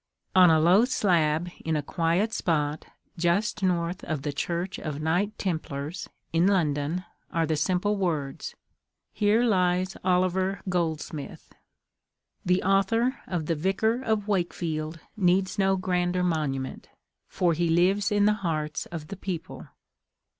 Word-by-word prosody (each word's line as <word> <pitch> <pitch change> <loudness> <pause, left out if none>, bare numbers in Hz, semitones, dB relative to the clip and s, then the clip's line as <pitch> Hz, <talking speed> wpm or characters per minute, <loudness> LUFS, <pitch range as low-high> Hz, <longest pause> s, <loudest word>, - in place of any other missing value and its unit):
On 185 -2 +8
a 160 -1 +5
low 180 +7 +5
slab 175 -8 +1
in 160 -1 0
a 150 - -1
quiet 170 +8 0
spot, 150 -3 -1 0.3
just 180 +5 +1
north 180 -1 0
of 155 -4 -3
the 145 -1 -2
Church 175 +5 -3
of 150 -2 -4
Knight 180 +7 0
Templars, 160 -2 -4 0.2
in 165 +3 +4
London, 165 -2 0 0.2
are 165 -2 0
the 160 0 0
simple 185 +7 +1
words, 160 -7 -2 0.6
"Here 215 +2 +3
lies 185 -4 +1
Oliver 185 +1 +1
Goldsmith." 160 -4 -3 0.9
The 180 +1 +2
author 225 +7 +2
of 175 -4 -2
the 165 - 0
"Vicar 195 +9 0
of 220 -4 -1
Wakefield" 165 -4 -2 0.2
needs 190 +1 +1
no 195 0 +3
grander 180 -1 0
monument; 150 -6 -2 0.4
for 175 -2 +1
he 170 +1 0
lives 190 +5 +3
in 205 0 +3
the 210 - +5
hearts 155 -4 -2
of 160 -3 -7
the - - -5
people. 185 -3 -6
180 Hz, 135 wpm, -27 LUFS, 160-195 Hz, 0.9 s, On